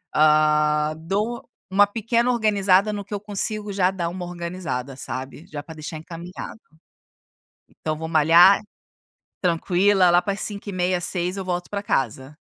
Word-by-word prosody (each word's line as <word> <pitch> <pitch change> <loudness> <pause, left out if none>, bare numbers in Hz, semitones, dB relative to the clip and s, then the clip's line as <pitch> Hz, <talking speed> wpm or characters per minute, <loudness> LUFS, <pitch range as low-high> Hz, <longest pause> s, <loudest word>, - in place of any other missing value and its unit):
Hã, 150 0 +3
dou 205 +8 -3 0.2
uma 200 +2 +5
pequena 230 +3 0
organizada 205 -3 +3
no 205 -1 -5
que 210 - -9
eu 205 - -2
consigo, 210 +1 -3
já 185 -1 +2
dá 175 -3 -3
uma 180 +1 -6
organizada, 170 -7 -5
sabe? 135 +3 -7
Já 145 -2 -6
para 160 +2 -11
deixar 155 +1 -7
encaminhado. 170 +6 -9 1.3
Então 155 - +1
vou 160 +1 -5
malhar, 165 +5 +6 0.8
tranquila. 180 +2 +3
Lá 175 +1 +5
para 200 - -2
as 200 - -5
17:30, 185 -3 -1
18h, 180 +1 -2
eu 195 - -4
volto 175 -1 -3
para 200 -1 -3
casa. 135 - -2
180 Hz, 150 wpm, -23 LUFS, 155-200 Hz, 1.3 s, malhar